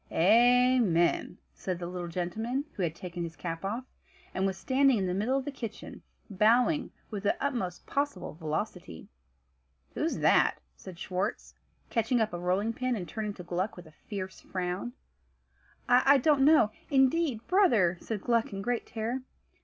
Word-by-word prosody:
"Amen," 230 -3 +4 0.2
said 185 -2 -4
the 175 - -5
little 175 0 -5
gentleman, 220 - -2
who - - -5
had 165 -3 -1
taken 175 0 -7
his 165 -1 -5
cap 165 +2 -5
off, 220 +6 -3 0.5
and 190 +1 +1
was 190 -1 -3
standing 270 +1 +3
in 195 - 0
the 180 - -1
middle 220 +8 +1
of 270 - -3
the 290 - -3
kitchen, 230 -6 -8 0.3
bowing 240 - +3 0.2
with 205 -2 -4
the 205 - +1
utmost 235 -11 -3
possible 285 +1 -2
velocity. 155 - -5 0.8
"Who's - - -1
that?" - - +4 0.2
said 185 -3 -11
Schwartz, 185 +5 -3 0.4
catching 235 +1 +1
up 220 -3 0
a 175 - -3
rolling 190 +6 0
pin, 255 +1 -1
and 180 -5 -5
turning 210 +3 -4
to 180 - -9
Gluck 180 +4 -2
with 180 - -10
a 160 - -15
fierce 190 +3 -7
frown. 180 -9 -4 0.9
"I 255 +3 +6
don't 285 +1 +3
know, 290 -7 +5 0.2
indeed, 270 -3 +2
brother," 230 - +3
said 215 -3 -4
Gluck 230 0 +1
in 195 0 -5
great 245 +1 -2
terror. 230 +4 -3
210 Hz, 160 wpm, -29 LUFS, 180-250 Hz, 0.9 s, I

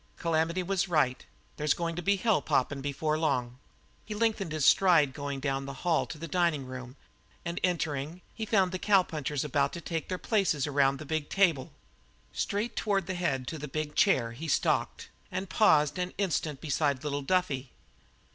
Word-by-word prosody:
Calamity 165 +2 0
was 195 +1 0
right; 150 -7 +1 0.3
there's 150 0 +1
going 170 -1 -2
to 175 - -3
be 200 +4 +2
hell 200 -4 +2
poppin' 135 +1 0
before 150 +3 -1
long." 125 -5 -1 0.4
He 215 - -6
lengthened 210 -5 0
his 155 -3 0
stride 165 -8 +5
going 140 -1 -4
down 135 0 -2
the 140 - -5
long 130 - -12
hall 170 -3 +2
to 155 - -7
the 165 +2 -6
dining 165 -4 +1
room, 130 0 -8 0.5
and 170 +1 -3
entering, 160 -2 -1
he 225 - -5
found 190 -4 +3
the 185 - -3
cowpunchers 155 -9 +1
about 140 -1 0
to 170 - -5
take 165 -1 -4
their 185 - -1
places 185 - +1
around 140 -2 +2
the 155 - -8
big 155 0 -2
table. 170 -10 +2 0.6
Straight 215 +4 -2
toward 195 -4 0
the 185 - -3
head 140 -8 -1
to 160 - -6
the 150 - -5
big 150 +1 -3
chair 120 - +3
he 145 +8 -7
stalked, 145 - 0 0.2
and 185 +1 -4
paused 155 -6 +4
an 180 0 -3
instant 160 -7 -1
beside 145 -2 0
little 145 -1 -2
Duffy. 140 -5 0
155 Hz, 185 wpm, -29 LUFS, 140-180 Hz, 0.6 s, stride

